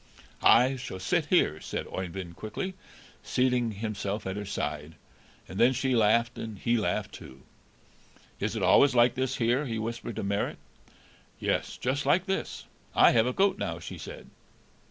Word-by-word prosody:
"I 130 Hz, +3 st, +5 dB
shall 95 Hz, -7 st, -7 dB
sit 160 Hz, -, 0 dB
here," 80 Hz, -, +2 dB
said -, -, -4 dB
Oeyvind 90 Hz, -1 st, -6 dB
quickly, 110 Hz, -, -5 dB, 0.5 s
seating 125 Hz, -2 st, +1 dB
himself 105 Hz, -1 st, -4 dB
at 95 Hz, 0 st, -3 dB
her 105 Hz, -1 st, -5 dB
side, 75 Hz, -2 st, -4 dB, 0.5 s
and 95 Hz, -, -7 dB
then 125 Hz, +3 st, +5 dB
she 130 Hz, +1 st, 0 dB
laughed 115 Hz, +2 st, +2 dB
and 110 Hz, -2 st, -6 dB
he 120 Hz, +5 st, +1 dB
laughed 105 Hz, -2 st, -1 dB
too. 65 Hz, +1 st, -12 dB, 1.0 s
"Is -, -, -2 dB
it -, -, -2 dB
always 140 Hz, -2 st, +5 dB
like 120 Hz, 0 st, +5 dB
this 130 Hz, +1 st, -1 dB
here?" 125 Hz, +4 st, +1 dB
he 115 Hz, -2 st, -3 dB
whispered 115 Hz, 0 st, -4 dB
to 110 Hz, -, -3 dB
Marit. 100 Hz, +1 st, -1 dB, 0.8 s
"Yes, -, -, -1 dB
just 135 Hz, +2 st, -1 dB
like 175 Hz, +6 st, +3 dB
this; 195 Hz, -, -3 dB, 0.3 s
I -, -, +7 dB
have 115 Hz, +1 st, +3 dB
a 125 Hz, -, -1 dB
goat 195 Hz, +4 st, +2 dB
now," -, -, -2 dB
she -, -, -8 dB
said. -, -, -10 dB
115 Hz, 165 wpm, -28 LUFS, 100-130 Hz, 1.0 s, I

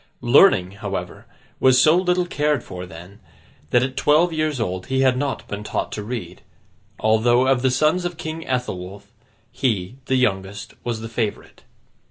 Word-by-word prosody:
Learning, 120 Hz, -, +5 dB
however, 100 Hz, -3 st, -6 dB, 0.3 s
was 130 Hz, -1 st, +5 dB
so 155 Hz, +5 st, +6 dB
little 180 Hz, 0 st, +1 dB
cared 150 Hz, -5 st, 0 dB
for, 90 Hz, -1 st, -8 dB
then, 90 Hz, +4 st, -12 dB, 0.5 s
that 120 Hz, -, +3 dB
at 130 Hz, 0 st, -3 dB
twelve 155 Hz, +5 st, +3 dB
years 155 Hz, -3 st, -1 dB
old 95 Hz, -4 st, -3 dB
he 130 Hz, 0 st, 0 dB
had 130 Hz, -1 st, +4 dB
not 140 Hz, +1 st, -3 dB
been 105 Hz, +1 st, -5 dB
taught -, -, -3 dB
to 105 Hz, -, -4 dB
read; 105 Hz, -5 st, -6 dB, 0.6 s
although, 120 Hz, +3 st, +3 dB
of 130 Hz, -2 st, +2 dB
the 130 Hz, -, +3 dB
sons 155 Hz, +7 st, +2 dB
of 175 Hz, -2 st, -4 dB
King 160 Hz, 0 st, -5 dB
Ethelwulf, 100 Hz, -5 st, -4 dB, 0.4 s
he, 110 Hz, -3 st, -2 dB
the 130 Hz, -, +1 dB
youngest, 100 Hz, -5 st, -1 dB
was 115 Hz, -2 st, -3 dB
the 115 Hz, -, -5 dB
favourite. 115 Hz, -2 st, -4 dB
125 Hz, 165 wpm, -22 LUFS, 100-145 Hz, 0.6 s, so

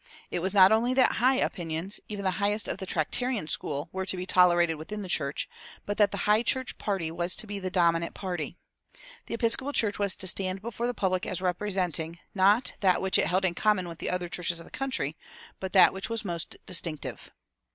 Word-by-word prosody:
It -, -, -1 dB
was 190 Hz, +3 st, 0 dB
not 195 Hz, -1 st, +7 dB
only 235 Hz, +3 st, +2 dB
that 260 Hz, -, +4 dB
"high" 255 Hz, +3 st, +4 dB
opinions, 175 Hz, -, -2 dB
even 205 Hz, -2 st, -5 dB
the 185 Hz, +1 st, -1 dB
highest 205 Hz, +1 st, +1 dB
of -, -, -4 dB
the 190 Hz, -, -6 dB
Tractarian 210 Hz, +6 st, -1 dB
school, 145 Hz, 0 st, -2 dB
were 190 Hz, 0 st, -4 dB
to 190 Hz, -, 0 dB
be 180 Hz, -, -4 dB
tolerated 175 Hz, -3 st, +4 dB
within 205 Hz, +7 st, -6 dB
the -, -, -6 dB
church, 140 Hz, -5 st, -1 dB, 0.4 s
but 205 Hz, -, -3 dB
that 205 Hz, -1 st, +5 dB
the 200 Hz, -, -3 dB
High 210 Hz, +1 st, +4 dB
church 260 Hz, +2 st, 0 dB
party 190 Hz, -6 st, -2 dB
was 175 Hz, +2 st, -1 dB
to -, -, -2 dB
be 205 Hz, -1 st, -5 dB
the 185 Hz, -1 st, -3 dB
dominant 170 Hz, -2 st, +1 dB
party. 175 Hz, -4 st, -4 dB, 0.7 s
The -, -, -3 dB
Episcopal 240 Hz, +5 st, +1 dB
Church 210 Hz, -6 st, +2 dB
was 200 Hz, -2 st, +2 dB
to -, -, -4 dB
stand 185 Hz, 0 st, -1 dB
before 235 Hz, +1 st, -3 dB
the 245 Hz, -, -2 dB
public 185 Hz, -2 st, 0 dB
as 185 Hz, -3 st, -2 dB
representing, 180 Hz, -3 st, -1 dB, 0.2 s
not 200 Hz, +5 st, +3 dB
that 185 Hz, -3 st, +3 dB
which 190 Hz, 0 st, +2 dB
it -, -, +2 dB
held 185 Hz, +2 st, +1 dB
in 180 Hz, -, +2 dB
common 190 Hz, -1 st, +1 dB
with 165 Hz, -1 st, -9 dB
the -, -, -3 dB
other 180 Hz, -1 st, -2 dB
churches 175 Hz, -1 st, -2 dB
of 165 Hz, -, -11 dB
the -, -, -16 dB
country, 255 Hz, -, -2 dB, 0.4 s
but 190 Hz, -1 st, -4 dB
that 190 Hz, -, +7 dB
which 190 Hz, +3 st, -4 dB
was 230 Hz, -1 st, -3 dB
most 170 Hz, -3 st, -4 dB
distinctive. 165 Hz, -4 st, -3 dB
190 Hz, 215 wpm, -28 LUFS, 175-210 Hz, 0.7 s, not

